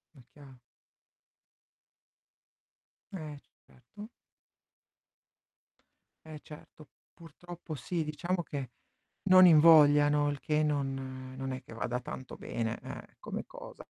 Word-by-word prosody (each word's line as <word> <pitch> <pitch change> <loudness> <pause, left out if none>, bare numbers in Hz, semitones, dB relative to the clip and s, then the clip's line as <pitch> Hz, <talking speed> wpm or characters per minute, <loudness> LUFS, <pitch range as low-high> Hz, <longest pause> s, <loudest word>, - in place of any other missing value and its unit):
È 130 - -16
chia 140 -3 -15 2.6
Eh, 155 -6 -7 0.3
certo. 205 - -13 2.2
Eh 155 -1 -9
certo, 150 0 -14 0.3
purtroppo 170 0 -10
sì, 160 +4 -3
diciamo 175 +4 -2
che 140 -6 -6 0.5
non 185 -1 +7
invogliano, 150 -3 +6
il 145 -1 -4
che 155 +2 0
non 135 -3 -3
non 135 0 -4
è 130 - -5
che - - -13
vada 120 +2 -3
tanto 130 +1 -8
bene, 115 0 -4
eh, - - -10
come - - -6
cosa. - - -12
150 Hz, 105 wpm, -30 LUFS, 135-165 Hz, 2.6 s, non